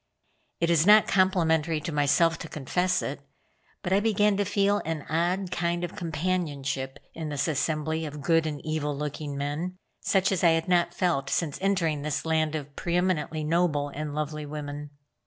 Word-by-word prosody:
It 170 0 +2
is 165 +1 +3
not 210 +1 +8
complimentary 165 -4 +2
to 165 - -4
myself 150 +3 +3
to - - -6
confess 180 +5 0
it, 140 +1 -4 0.6
but 185 - 0
I 195 - +5
began 210 -1 +3
to 205 - +1
feel 200 +1 +2
an 160 -2 -3
odd 175 +3 0
kind 175 0 -1
of 175 - -4
companionship 150 -5 -2 0.2
in 160 -2 -5
this 145 +1 -1
assembly 160 +1 -1
of 150 0 -7
good 165 0 +3
and 150 -2 -4
evil 150 -2 -2
looking 145 0 -4
men, 150 +6 -3 0.2
such 190 -1 +2
as 190 - 0
I 170 -2 +6
had 165 - -3
not 175 -1 +2
felt 150 -7 0
since 155 -5 -1
entering 175 -7 +1
this 150 +1 -2
land 160 -1 +1
of 145 -2 -6
pre 170 0 -2
eminently 165 -4 0
noble 155 -3 +1
and 150 +1 -5
lovely 150 0 -3
women. 145 0 -6
160 Hz, 175 wpm, -27 LUFS, 150-180 Hz, 0.6 s, not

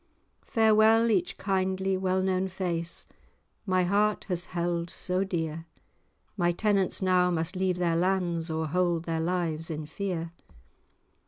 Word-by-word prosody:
[#] - - -44
Farewell 220 +1 +4
each 185 -4 0
kindly 190 0 0
well 185 0 0
known 190 0 +1
face, 175 -3 -2 0.6
My 185 -1 +2
heart 205 +3 +1
has 180 -1 -1
held 170 -1 -2
so 185 +3 -1
dear: 165 -3 -3 0.7
My 175 -3 +2
tenants 195 +1 0
now 180 -1 +3
must 165 +1 -2
leave 185 -1 0
their 170 -2 +1
lands, 175 -2 0
Or 160 0 -1
hold 175 +1 0
their 165 -1 -1
lives 165 -2 -2
in 155 -1 -4
fear. 170 0 -4
180 Hz, 140 wpm, -28 LUFS, 170-190 Hz, 0.7 s, Farewell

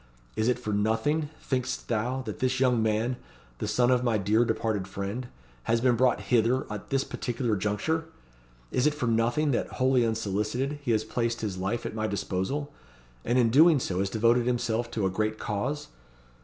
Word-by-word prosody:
Is 110 - 0
it 125 - +2
for 110 -4 -4
nothing, 130 +9 +1
think'st 130 -1 -2
thou, 120 +4 -1
that 110 -4 -6
this 130 0 0
young 125 -3 +3
man 110 +3 0 0.4
the - - -2
son 120 +4 +3
of 125 -1 +3
my 120 -3 +2
dear 105 +4 +3
departed 110 -4 -1
friend 100 +6 -4 0.4
has 115 0 +2
been 125 0 +3
brought 125 -2 +2
hither 120 +4 +2
at 105 - -8
this 135 -1 +1
particular 120 -1 -3
conjuncture? 105 - 0 0.7
Is 125 +4 +2
it 150 - +1
for 140 - -2
nothing 120 +6 +2
that, 120 - -1
wholly 130 -1 +3
unsolicited, 110 +5 -1
he 145 - -5
has 110 -2 +2
placed 115 +1 -2
his 100 -4 -3
life 95 +6 -2
at - - -4
my 110 0 -1
disposal, 105 +8 -2 0.5
and 120 +2 +1
in 115 -3 +4
doing 155 +3 +6
so 95 -6 -2
has 95 0 0
devoted 115 +3 +2
himself 120 -1 0
to 110 -4 -1
a - - +2
great 110 +3 -1
cause? 120 +9 -3
115 Hz, 185 wpm, -28 LUFS, 105-130 Hz, 0.7 s, doing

